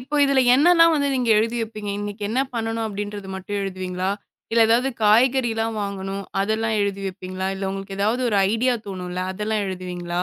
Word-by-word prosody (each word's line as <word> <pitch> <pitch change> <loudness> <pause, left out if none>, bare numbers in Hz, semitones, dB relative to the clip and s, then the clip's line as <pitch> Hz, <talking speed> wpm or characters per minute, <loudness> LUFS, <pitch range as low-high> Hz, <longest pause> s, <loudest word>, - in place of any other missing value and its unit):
இப்ப 290 +4 -2
இதுல 275 -1 +3
என்னெல்லாம் 330 +3 +6
வந்து 285 -2 +1
நீங்க 250 -2 0
எழுதி 230 +2 0
வைப்பீங்க? 215 -2 -5
"இன்னைக்கு 205 0 -6
என்ன 255 +4 +1
பண்ணணும்?" 225 0 -2
அப்படின்றது 205 -1 -5
மட்டும் 200 +2 -4
எழுதுவீங்களா? 185 -1 -3 0.4
இல்ல 230 0 +5
ஏதாவது 245 +4 +3 0.2
காய்கறில்லாம் 225 0 +3
வாங்கணும், 195 0 -4 0.2
அதெல்லாம் 220 +2 0
எழுதி 200 -1 -1
வைப்பீங்களா? 185 0 -5
இல்ல 195 0 -3
உங்களுக்கு 195 0 -6
ஏதாவது 220 +5 +1
ஒரு 210 - +1 0.2
ஐடியா 245 +2 +2
தோணும்ல்ல, 180 -2 -5
அதெல்லாம் 210 +1 -1
எழுதுவீங்களா? 180 -2 -4
210 Hz, 165 wpm, -23 LUFS, 195-230 Hz, 0.4 s, என்னெல்லாம்